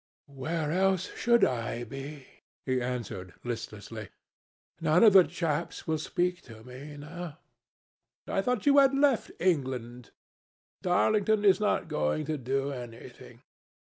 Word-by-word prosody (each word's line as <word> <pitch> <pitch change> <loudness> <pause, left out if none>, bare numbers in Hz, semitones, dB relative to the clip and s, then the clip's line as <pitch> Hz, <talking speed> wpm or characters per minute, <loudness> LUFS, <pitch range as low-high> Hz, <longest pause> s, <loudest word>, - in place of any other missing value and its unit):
"Where 150 +3 -3
else 190 +1 +1
should 235 0 +3
I 120 -1 -2
be?" 135 +3 -8 0.4
he 130 -1 0
answered, 110 -8 -5
listlessly. 110 -3 -6 0.7
"None 160 +3 +4
of 215 -3 +8
the 190 -2 +9
chaps 165 -1 -3
will 160 -1 0
speak 180 +3 -1
to 110 -1 -12
me 135 +4 -10
now." 165 +2 -8 0.9
"I 195 - 0
thought 250 +1 -1
you 285 0 +6
had 275 -1 +5
left 275 -4 +3
England." 130 - -1 0.7
"Darlington 210 +3 +2
is 190 -2 +6
not 210 - +1
going 75 - -1
to 155 0 -2
do 135 +2 -1
anything. 120 -3 -10
150 Hz, 130 wpm, -29 LUFS, 125-185 Hz, 0.9 s, the